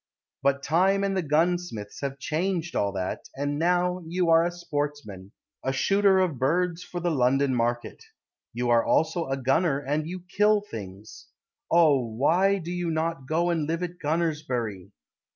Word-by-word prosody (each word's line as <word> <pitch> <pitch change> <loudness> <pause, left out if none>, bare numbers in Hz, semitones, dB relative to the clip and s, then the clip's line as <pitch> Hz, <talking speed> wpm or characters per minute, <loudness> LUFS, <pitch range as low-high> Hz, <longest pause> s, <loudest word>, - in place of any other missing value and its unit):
But 140 0 +1
time 190 +5 +2
and 195 -1 0
the 190 - +1
gunsmiths 160 -8 -1
Have 140 -1 -3
changed 170 +3 -2
all 100 -1 +1
that; 95 -1 -4
And 145 +1 -2
now 180 +1 +1
you 175 0 +1
are 165 0 +6
a 175 - 0
sportsman, 145 - -5 0.3
A 135 - 0
shooter 195 +8 +3
of 180 -9 +1
birds 175 +5 0
For 175 - -6
the 175 0 0
London 135 0 +2
market. 120 0 -2 0.5
You 120 +1 -1
are 115 -1 +4
also 160 +1 +1
a 135 0 -1
gunner, 135 +4 +1
And 145 +2 -2
you 180 +2 -6
kill 210 +2 +3
things. 110 - -10 0.4
Oh! 155 -5 +5
why 160 - +2
do 175 -2 -6
you 175 -1 -2
not 160 -4 -2
go 170 +3 +1
And 160 -3 -1
live 165 +2 -2
at 175 0 -6
Gunners 160 -1 0
bury? 110 -9 -4
160 Hz, 170 wpm, -26 LUFS, 135-175 Hz, 0.5 s, are